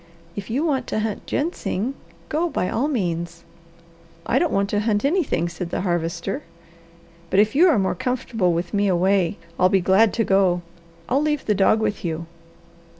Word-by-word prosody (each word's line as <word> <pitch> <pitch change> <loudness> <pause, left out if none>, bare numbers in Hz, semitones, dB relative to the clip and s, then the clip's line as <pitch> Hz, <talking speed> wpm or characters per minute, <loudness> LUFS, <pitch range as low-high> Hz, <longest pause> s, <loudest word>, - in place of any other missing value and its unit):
"If 205 0 -6
you 270 +8 0
want 270 -6 0
to 215 - -1
hunt 215 -2 -4
ginseng 275 - -2 0.3
go 330 +3 0
by 180 - -1
all 245 +6 0
means." 170 - -2 0.8
"I - - +2
don't 345 - +1
want 200 0 +1
to 205 - +1
hunt 210 +2 0
anything," 285 - +1
said 170 0 -5
the - - -2
Harvester. 175 +1 -2 0.9
"But 190 - +2
if 215 +1 +3
you 340 +6 +6
are 310 -9 +4
more 190 -2 +1
comfortable 240 -7 -1
with 170 +3 -2
me 205 0 +2
away, 185 0 +2 0.2
I'll 185 - +5
be 195 - +3
glad 195 +4 +4
to 230 - +2
go. 190 -3 +2 0.4
I'll 275 - +2
leave 300 -2 -1
the 210 - +2
dog 205 +2 +3
with 210 -2 -2
you." 165 -1 -3
205 Hz, 180 wpm, -22 LUFS, 180-255 Hz, 0.9 s, you